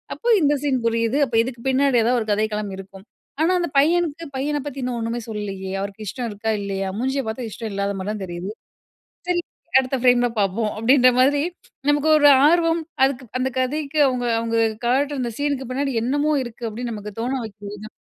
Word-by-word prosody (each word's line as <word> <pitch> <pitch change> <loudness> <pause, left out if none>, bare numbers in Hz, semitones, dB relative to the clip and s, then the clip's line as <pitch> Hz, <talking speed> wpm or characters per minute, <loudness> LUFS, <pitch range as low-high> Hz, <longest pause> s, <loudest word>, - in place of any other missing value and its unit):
அப்ப 470 -1 +3
இந்த 295 -1 +4
சீன் 270 -3 +1
புரியுது. 230 +3 +1
அப்ப, 230 - -4
இதுக்கு 240 -1 -7
பின்னாடி 265 -1 +3
எதாவது 245 +1 +2
ஒரு 220 - -5
கதைக்களம் 210 -1 -1
இருக்கும். 195 +1 -11 0.4
ஆனா, 330 +3 +3
அந்த 345 - -2
பையனுக்கு 330 +1 +1
"பையன 295 +2 -1
பத்தி 275 -1 -6
இன்னும் 245 -2 -2
ஒன்னுமே 230 +1 -2
சொல்லலயே. 195 -3 -5
அவருக்கு 200 +2 -6
இஷ்டம் 245 0 -4
இருக்கா? 215 +2 -2
இல்லையா? 195 -1 -3
மூஞ்சிய 265 +2 0
பார்த்தா 225 +1 -4
இஷ்டம் 220 0 -6
இல்லாதமாரி 200 0 -2
தான் 210 -2 -5
தெரியுது. 175 +2 -6 0.8
சரி, 355 -1 +1 0.4
அடுத்த 265 0 -1
ஃப்ரேம்ல 245 -1 +4
பார்ப்போம்." 210 +2 0
அப்படீன்ற 255 +3 +5
மாதிரி, 280 +3 +4 0.5
நமக்கு 290 +2 +2
ஒரு 290 -1 +6 0.2
ஆர்வம், 330 0 +3 0.2
"அதுக்கு 265 -1 +1
அந்த 260 +1 0
கதைக்கு 295 +3 -1
அவுங்க 250 -2 -1
அவுங்க 230 0 -1 0.3
காட்டுற 275 +3 +1
அந்த 240 -1 -2
சீனுக்கு 280 -3 -1
பின்னாடி 275 0 -1
என்னமோ 290 +5 +1
இருக்கு." 240 0 -8
அப்படீன்னு 235 +2 -5
நமக்கு 210 0 -7
தோண 250 +3 -1
வைக்குது 205 0 -9
தான் 215 - -9
245 Hz, 180 wpm, -22 LUFS, 215-280 Hz, 0.8 s, ஒரு